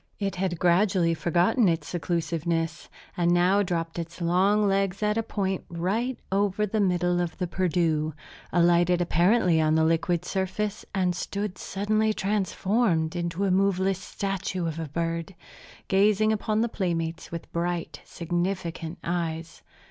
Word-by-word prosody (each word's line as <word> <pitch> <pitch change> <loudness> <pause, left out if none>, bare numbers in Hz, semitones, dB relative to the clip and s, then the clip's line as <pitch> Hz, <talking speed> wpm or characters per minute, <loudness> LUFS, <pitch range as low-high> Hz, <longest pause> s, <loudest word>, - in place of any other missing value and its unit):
It 195 -2 -3
had 180 -2 -1
gradually 175 0 +3
forgotten 175 +7 +2
its 165 0 -1
seclusiveness, 170 0 -2 0.3
and 175 -1 +2
now 180 +3 +4
dropped 170 -3 -2
its 170 +1 -6
long 190 +5 +3
legs 195 0 0
at 210 0 +2
a 225 - +1
point 195 -4 -2
right 205 +9 -1
over 200 +1 +1
the 215 +2 -2
middle 180 -2 +2
of 175 -2 -3
the 185 - -1
Perdu, 165 -4 0 0.4
alighted 175 0 +4
apparently 175 0 +3
on 155 0 +2
the 160 - +3
liquid 165 +2 +1
surface, 195 +3 -2
and 180 -2 +1
stood 200 +2 -4
suddenly 215 +2 0
transformed 195 -3 0
into 175 +2 -1
a 190 - +1
moveless 190 0 +2
statue 190 -1 -3
of 165 -1 -3
a 160 -2 -4
bird, 165 +3 -3 0.5
gazing 210 +2 +3
upon 215 0 0
the 235 - +2
playmates 170 -6 -3
with 170 -1 -7
bright, 170 -3 -2
significant 175 -1 -3
eyes. 165 -2 -3
180 Hz, 140 wpm, -26 LUFS, 170-195 Hz, 0.5 s, now